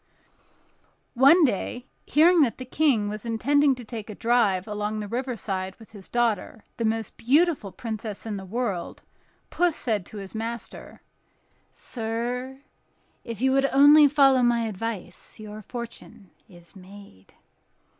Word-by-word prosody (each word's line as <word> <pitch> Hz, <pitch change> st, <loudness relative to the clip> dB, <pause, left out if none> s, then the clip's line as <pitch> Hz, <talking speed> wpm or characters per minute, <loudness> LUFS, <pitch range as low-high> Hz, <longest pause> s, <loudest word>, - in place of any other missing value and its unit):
One 280 Hz, +7 st, +6 dB
day, 245 Hz, +1 st, -3 dB, 0.2 s
hearing 330 Hz, +3 st, +5 dB
that 255 Hz, -6 st, +1 dB
the 255 Hz, -, -7 dB
King 255 Hz, -6 st, +1 dB
was 210 Hz, 0 st, -5 dB
intending 275 Hz, +5 st, +2 dB
to 245 Hz, -2 st, -10 dB
take 220 Hz, -1 st, -7 dB
a 210 Hz, -, -7 dB
drive 220 Hz, -6 st, +1 dB
along 210 Hz, 0 st, -3 dB
the 210 Hz, -, -5 dB
riverside 205 Hz, -6 st, -4 dB
with 225 Hz, -, -17 dB
his 200 Hz, -3 st, -12 dB
daughter, 230 Hz, -3 st, -1 dB
the 230 Hz, -, -1 dB
most 220 Hz, -1 st, -2 dB
beautiful 285 Hz, -, +2 dB
princess 220 Hz, -1 st, -6 dB
in 220 Hz, -2 st, -4 dB
the 195 Hz, -, -6 dB
world, 200 Hz, -2 st, -4 dB, 0.5 s
Puss 350 Hz, -3 st, +1 dB
said 210 Hz, -7 st, -1 dB
to 215 Hz, -, -10 dB
his 195 Hz, -1 st, -8 dB
master: 230 Hz, +1 st, -7 dB, 0.7 s
"Sir, 245 Hz, +3 st, -5 dB, 0.6 s
if 230 Hz, -2 st, -7 dB
you 265 Hz, 0 st, +3 dB
would 270 Hz, +1 st, +3 dB
only 290 Hz, +2 st, +7 dB
follow 270 Hz, -2 st, +4 dB
my 240 Hz, -1 st, +2 dB
advice, 215 Hz, -4 st, -6 dB
your 215 Hz, 0 st, -9 dB
fortune 235 Hz, -3 st, -9 dB, 0.2 s
is 175 Hz, -1 st, -17 dB
made." 190 Hz, -, -15 dB
230 Hz, 140 wpm, -25 LUFS, 205-260 Hz, 0.7 s, only